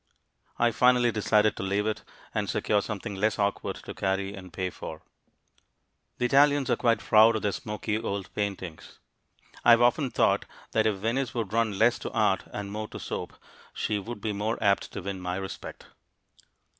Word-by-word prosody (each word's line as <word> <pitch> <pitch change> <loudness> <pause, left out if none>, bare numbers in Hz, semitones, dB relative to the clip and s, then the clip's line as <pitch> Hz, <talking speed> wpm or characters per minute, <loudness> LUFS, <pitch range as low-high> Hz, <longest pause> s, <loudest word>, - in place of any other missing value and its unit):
I 120 0 +3
finally 125 +1 +4
decided 105 0 +2
to - - -4
leave 100 +2 0
it 110 -1 -1 0.3
and - - -1
secure 105 -1 +1
something 105 0 -5
less 105 +2 0
awkward 100 -1 -1
to - - -6
carry 95 0 -1
and 95 -2 -10
pay 95 +1 -3
for. 80 -2 -8 1.1
The 125 - 0
Italians 140 +1 +4
are - - +4
quite 115 -2 +2
proud 110 +1 +5
of 110 - -2
their 105 - +1
smoky 105 +1 -3
old 100 -4 -4
paintings. 95 -5 -5 0.7
I - - +4
have 120 0 +8
often 130 +3 +3
thought - - +2 0.3
that 110 0 +2
if 105 - +1
Venice 115 +4 -1
would 110 -4 -3
run 110 -3 +1
less 115 +3 +4
to - - -5
art 105 -4 +2
and 100 -1 -5
more 110 +1 -4
to - - -9
soap, - - -5 0.4
she 105 -1 -1
would 110 +1 -7
be 105 0 -2
more 105 +3 -1
apt 100 -2 +1
to 100 - -5
win 95 -1 -4
my 90 0 -2
respect. 95 0 -7
105 Hz, 180 wpm, -27 LUFS, 100-115 Hz, 1.1 s, have